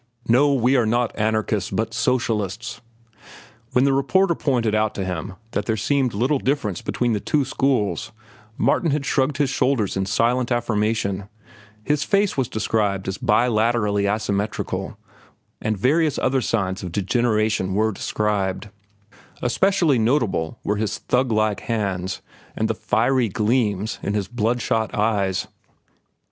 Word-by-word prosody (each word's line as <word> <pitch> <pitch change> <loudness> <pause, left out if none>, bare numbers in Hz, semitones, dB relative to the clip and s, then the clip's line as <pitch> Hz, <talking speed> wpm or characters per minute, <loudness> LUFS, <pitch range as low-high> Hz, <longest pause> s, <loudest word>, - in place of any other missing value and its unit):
"No, 135 +5 +4
we 125 +1 +3
are 120 -4 +3
not 120 +1 0
anarchists 110 -2 0
but 115 +1 -2
socialists." 115 -3 -1 0.9
When 125 - +4
the 140 0 +3
reporter 170 +7 +2
pointed 120 -9 0
out 110 0 +1
to 95 - -2
him 90 +1 -4 0.2
that 105 -2 -2
there 110 - 0
seemed 130 0 0
little 130 +7 +1
difference 130 - -1
between 120 -2 -1
the 105 - 0
two 145 +6 0
schools, 130 -5 0 0.5
Martin 170 - +2
had 145 -1 -1
shrugged 135 0 +1
his 140 -2 +1
shoulders 130 -7 +1
in 95 0 -1
silent 120 +5 +1
affirmation. 105 -4 0 0.5
His 150 +4 0
face 200 +2 +1
was 130 -3 0
described 105 -3 -1
as 95 - -3
bilaterally 110 -3 +2
asymmetrical, 105 0 -2 0.6
and 110 -1 -1
various 150 - +2
other 130 0 +1
signs 95 -5 -1
of 90 - -6
degeneration 105 -1 0
were 110 +1 +2
described. 105 -1 -2 0.7
Especially 160 +1 +2
notable 115 - 0
were 105 - 0
his 105 0 -2
thuglike 110 -5 +1
hands 95 -5 -3 0.3
and - - 0
the - - 0
fiery 130 -4 +1
gleams 105 -1 0
in 100 - -2
his 100 -2 -1
blood 120 0 -1
shot 110 -2 -1
eyes. 100 -3 0
110 Hz, 140 wpm, -22 LUFS, 105-130 Hz, 0.9 s, No